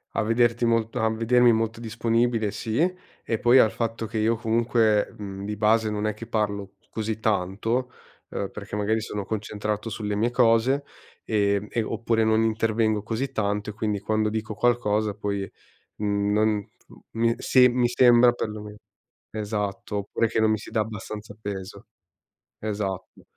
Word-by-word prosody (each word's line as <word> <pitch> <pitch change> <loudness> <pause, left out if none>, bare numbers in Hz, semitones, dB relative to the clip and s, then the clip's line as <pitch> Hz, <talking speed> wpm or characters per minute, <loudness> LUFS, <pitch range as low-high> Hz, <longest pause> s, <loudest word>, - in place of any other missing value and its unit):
a - - +2
vederti 120 +2 +2
molt 115 0 +1
a 110 -1 +2
vedermi 120 +2 +4
molto 115 0 0
disponibile, 115 -1 0
sì. 110 +3 -3 0.4
E 115 - -2
poi 120 +2 +5
al 110 -3 +6
fatto 115 0 -3
che 110 0 -3
io, 115 +2 +2
comunque, 115 -2 +2
mhmm, 100 -1 -7
di 105 +1 -3
base 110 +1 +3
non 105 0 -2
è 110 - 0
che 115 +2 -10
parlo 100 -3 -2 0.2
così 110 0 -3
tanto, 110 +5 -1 0.4
ehm, 100 - -3
perché, 105 0 -7
magari, 110 +2 0
sono 105 -1 -4
concentrato 105 +1 -3
sulle 105 -1 -3
mie 115 +4 +1
cose 125 +3 +3 0.4
ehm 100 -1 +1
e, 115 - -1
oppure, 115 +1 0
non 110 0 +3
intervengo 110 -1 +1
così 115 +5 -3
tanto. 105 0 -1
E - - -13
quindi, 105 -2 -2
quando 110 0 0
dico 110 0 -3
qualcosa 110 -3 +1
poi, 100 -2 -3 0.5
uhm 100 -1 0
non 105 -1 +1 0.5
uhm, 115 +1 +2
se 125 -1 +5
mi 120 0 +2
sembra, 120 0 +6
perlome 105 -2 -6 0.6
esatto, 105 -1 -3
oppure 100 +3 0
che 110 - 0
non 110 0 +3
mi 110 - +2
si - - -11
dà 110 - 0
abbastanza 105 -1 -5
peso. 100 -2 -7 0.7
Esatto. 100 -3 -4
110 Hz, 160 wpm, -25 LUFS, 105-115 Hz, 0.7 s, al